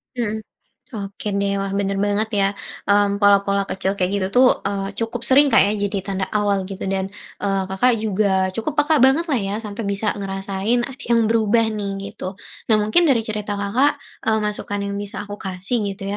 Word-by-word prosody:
Mhm, 220 -3 -2 0.6
oke 200 +1 -6
deh, 200 0 0
wah, 195 0 -2
benar 195 -1 -1
banget 205 +2 +1
ya, 200 -1 +3 0.4
mmm, 200 0 +2
pola-pola 200 0 +4
kecil 190 0 -2
kayak 185 -2 0
gitu 190 - 0 0.2
tuh, 260 - +7 0.2
eee, 195 -1 -2
cukup 230 +1 -2
sering 265 +4 +6
Kak 280 - +5
ya, 200 - +2 0.2
jadi 200 0 -2
tanda 195 -1 -2
awal 200 -2 +1
gitu. 195 0 -7
Dan, 190 0 -1 0.3
eee, 195 -1 0
Kakak 240 +6 +3
juga 190 -3 +1
cukup 225 +10 -3
peka 310 0 +3
banget 265 +5 +5
lah 265 - +2
ya, 200 -1 -2
sampai 210 0 -5
bisa 200 +1 0
ngerasain 195 +4 -1
ada 270 +2 -7
yang 230 -2 +3
berubah 225 0 +3
nih, 200 -2 -4
gitu. 200 -2 -7 0.3
Nah 220 - +4
mungkin 215 +12 +3
dari 250 -6 +3
cerita 210 -1 -4
Kakak, 245 +9 +1 0.2
eee, 220 0 +3
masukan 210 -1 -2
yang 200 0 -3
bisa 205 0 -4
aku 205 0 -8
kasih 190 +5 -2 0.2
gitu 195 - -12
205 Hz, 190 wpm, -21 LUFS, 195-225 Hz, 0.6 s, tuh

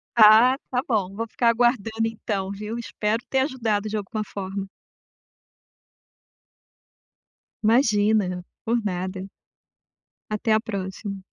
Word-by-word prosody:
Ah, 225 +3 +8 0.2
tá 250 0 +1
bom, 195 -5 0
vou 230 +2 -3
ficar 235 +1 0
aguardando 225 -2 +1
então, 200 -3 -3
viu. 210 +3 -5
Espero 225 0 -2
ter 265 - +2
ajudado 230 -6 0
de 215 - -2
alguma 215 +2 -3
forma. 195 -1 -5 3.0
Imagina, 210 -5 +3 0.2
por 230 +1 +1
nada. 185 0 -4 1.0
Até 215 +2 -1
a 215 - +4
próxima. 195 -1 -5
215 Hz, 105 wpm, -24 LUFS, 200-230 Hz, 3.0 s, Ah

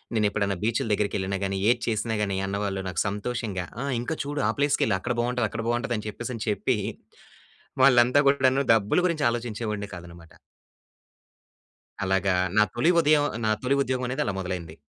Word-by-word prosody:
నేనెప్పుడన్నా 105 -2 +1
బీచ్‌లు 115 +3 0
దగ్గరికి 105 0 0
ఎళ్ళినా 95 +1 -2
గానీ, 95 0 -2
ఏది 120 0 +2
చేసినా 110 0 -1
గాని 100 -2 -1
అన్నవాళ్ళు 100 0 -2
నాకు 85 - -1
సంతోషంగా 105 -2 -3 0.2
"ఆ! - - -2 0.2
ఇంకా 140 +7 -3
చూడు 145 0 -3
ఆ - - +3
ప్లేస్‌కెళ్ళు 145 -8 +2
అక్కడ 120 +5 -2
బాగుంటది 120 -1 0
అక్కడ 115 0 -5
బాగుంటది." 120 +1 0
అని 105 - -6
చెప్పేసి 120 +4 -6
అని 110 - -5
చెప్పి 115 +3 0 1.1
వాళ్ళంతా 125 +1 +6
గూడాను 135 -1 +3
డబ్బులు 110 - +2
గురించి 160 -4 -1
ఆలోచించేవాడినె 110 -3 -4
కాదన్నమాట. 85 -2 -12 1.7
అలాగా 95 0 +1 0.2
నా 105 - +7
తొలి 140 +9 +3
ఉదయం 150 -2 +4 0.2
నా 110 - +2
తొలి 130 +2 +2
ఉద్యోగం 130 -1 -1
అనేది 135 +4 -1
అలా 100 - -1
మొదలైంది. 90 -4 -5
110 Hz, 160 wpm, -26 LUFS, 100-125 Hz, 1.7 s, నా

